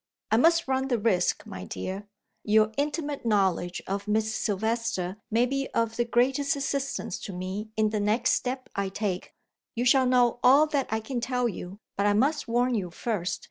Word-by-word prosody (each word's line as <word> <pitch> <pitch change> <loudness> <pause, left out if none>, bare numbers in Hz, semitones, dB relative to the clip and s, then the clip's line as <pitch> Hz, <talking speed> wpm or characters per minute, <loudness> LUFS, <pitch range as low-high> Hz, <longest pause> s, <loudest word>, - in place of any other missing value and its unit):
"I 220 - +5
must 330 +5 +4
run 265 0 0
the 245 -3 +1
risk, 205 -5 +1
my 90 - -7
dear; 190 - -5 0.4
your 215 0 +3
intimate 290 0 -2
knowledge 190 -5 +1
of 200 +2 -3
Miss 220 +1 +1
Silvester 215 -3 -1
may 230 +2 +3
be 275 +2 -2
of 230 -1 +1
the 240 - +1
greatest 270 +5 +2
assistance 275 -6 -2
to - - -7
me 190 +4 -5
in 215 -1 +2
the 215 - -1
next 210 +3 +2
step 255 +1 -1
I 200 -1 -1
take. 195 -2 -3 0.4
You 240 +1 -1
shall 260 0 +5
know 245 -1 +3
all 275 +5 +7
that 290 -3 -1
I 220 +1 -1
can 240 +2 -4
tell 250 0 0
you, 190 -2 -6 0.2
but 200 +1 +2
I 205 - +4
must 285 +8 +1
warn 245 +2 +1
you 195 -6 -1
first. 180 -1 -2
230 Hz, 185 wpm, -27 LUFS, 205-255 Hz, 0.4 s, all